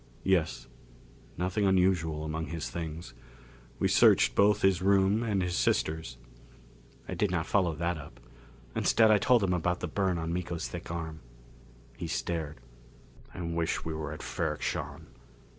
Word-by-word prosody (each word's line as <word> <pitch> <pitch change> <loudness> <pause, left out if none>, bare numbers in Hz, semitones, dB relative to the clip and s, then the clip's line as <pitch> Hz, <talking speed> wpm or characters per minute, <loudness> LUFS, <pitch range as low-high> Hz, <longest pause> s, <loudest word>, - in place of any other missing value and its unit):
"Yes. 95 -5 +1 0.7
Nothing 95 +3 0
unusual 90 -5 +2
among 80 0 -3
his 80 0 -5
things. 80 -5 -6 0.6
We - - +1
searched - - +5
both 105 +1 +3
his 95 -2 +3
room 100 +2 +3
and 105 -5 0
his 90 0 -2
sister's." 80 -7 0 0.9
I - - -4
did 105 - +1
not 85 -3 -1
follow 90 -5 +1
that 85 +1 -1
up. 60 -4 -12 0.6
Instead 110 -1 +4
I 105 - +5
told 120 +1 +4
him 90 -2 +1
about 90 0 0
the 90 - -3
burn 95 +1 0
on 80 0 -3
Miko's 85 -5 -3
thick - - -7
arm. 80 -2 -5 0.8
He 85 - -4
stared. 80 -2 -3 0.8
"I - - -6
wish 85 -1 -2
we 80 - -3
were 80 -1 -4
at 75 - -7
Ferrok - - -3
Shahn. - - -3
85 Hz, 155 wpm, -30 LUFS, 80-95 Hz, 0.9 s, searched